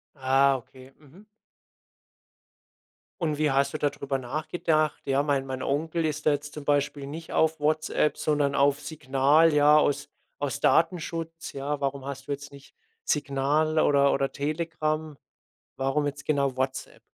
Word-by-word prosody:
Ah, 135 Hz, 0 st, +3 dB
okay. 130 Hz, +1 st, -11 dB
Mhm. 155 Hz, +8 st, -18 dB, 2.0 s
Und 155 Hz, -2 st, -1 dB
wie 155 Hz, -1 st, +2 dB
hast 135 Hz, +2 st, +1 dB
du 155 Hz, -, -3 dB
da 145 Hz, -, +2 dB
drüber 135 Hz, -1 st, -4 dB
nachgedacht? 155 Hz, +3 st, -1 dB
Ja, 135 Hz, +1 st, +2 dB
mein 140 Hz, -2 st, 0 dB
mein 130 Hz, -1 st, -4 dB
Onkel 160 Hz, +4 st, -1 dB
ist 155 Hz, 0 st, -2 dB
da 150 Hz, -, +6 dB
jetzt 145 Hz, 0 st, -3 dB
zum 150 Hz, -2 st, -8 dB
Beispiel 145 Hz, -1 st, 0 dB
nicht 160 Hz, +3 st, -8 dB
auf 160 Hz, 0 st, +2 dB
WhatsApp, 155 Hz, 0 st, +1 dB
sondern 145 Hz, -2 st, +1 dB
auf 140 Hz, +1 st, +3 dB
Signal, 145 Hz, +1 st, +2 dB
ja, 150 Hz, +1 st, +6 dB
aus 145 Hz, -1 st, 0 dB, 0.3 s
aus -, -, -2 dB
Datenschutz, 165 Hz, -1 st, 0 dB
ja. 140 Hz, +1 st, -3 dB
Warum 140 Hz, -1 st, -2 dB
hast 140 Hz, 0 st, -7 dB
du 145 Hz, -, -4 dB
jetzt 145 Hz, +1 st, -5 dB
nicht 140 Hz, -1 st, -15 dB, 0.3 s
Signal 150 Hz, +2 st, +1 dB
oder 140 Hz, -2 st, +4 dB
oder 135 Hz, 0 st, 0 dB
Telegram? 155 Hz, 0 st, -2 dB, 0.6 s
Warum 135 Hz, +2 st, 0 dB
jetzt 145 Hz, 0 st, -5 dB
genau 140 Hz, -3 st, 0 dB
WhatsApp? 130 Hz, 0 st, -3 dB
145 Hz, 150 wpm, -26 LUFS, 140-155 Hz, 2.0 s, da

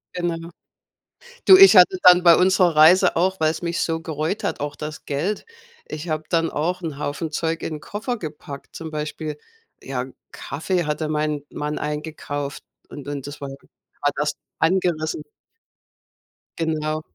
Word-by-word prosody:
Genau. 170 Hz, -1 st, -3 dB, 1.0 s
Du, 375 Hz, -, +10 dB
ich 390 Hz, -, +9 dB
hatte 185 Hz, 0 st, +7 dB
dann 180 Hz, 0 st, +7 dB
bei 170 Hz, -2 st, +8 dB
unserer 180 Hz, -2 st, +3 dB
Reise 175 Hz, +4 st, +6 dB
auch 185 Hz, +2 st, +1 dB
weil's 155 Hz, 0 st, +1 dB
mich 170 Hz, -1 st, -2 dB
so 165 Hz, -1 st, -1 dB
gereut 160 Hz, +5 st, -3 dB
hat, -, -, -2 dB
auch 145 Hz, 0 st, -4 dB
das 150 Hz, +1 st, -7 dB
Geld. 165 Hz, +9 st, -2 dB, 0.4 s
Ich 155 Hz, +3 st, -6 dB
habe 155 Hz, 0 st, -2 dB
dann 165 Hz, -1 st, +1 dB
auch 180 Hz, +5 st, -2 dB
'n 160 Hz, -5 st, -5 dB
Haufen 150 Hz, +2 st, -4 dB
Zeug 165 Hz, +1 st, -2 dB
in 155 Hz, -, -4 dB
'n -, -, -8 dB
Koffer 225 Hz, -, -4 dB
gepackt, 150 Hz, -5 st, -9 dB
zum 165 Hz, -1 st, -6 dB
Beispiel. 150 Hz, 0 st, -5 dB, 0.5 s
Ja, 130 Hz, -2 st, -3 dB, 0.3 s
Kaffee 175 Hz, +1 st, -3 dB
hatte 150 Hz, +1 st, -2 dB
mein 150 Hz, -1 st, -1 dB
Mann 150 Hz, 0 st, -4 dB
eingekauft 150 Hz, -1 st, -5 dB, 0.3 s
und 145 Hz, -1 st, -10 dB
und 145 Hz, -1 st, -5 dB
das 145 Hz, 0 st, -9 dB
war 140 Hz, -, -5 dB
war 140 Hz, +1 st, -6 dB
das 150 Hz, 0 st, -1 dB, 0.3 s
angerissen. 160 Hz, -3 st, 0 dB, 1.4 s
Genau. 155 Hz, -1 st, -1 dB
155 Hz, 155 wpm, -22 LUFS, 150-175 Hz, 1.4 s, Du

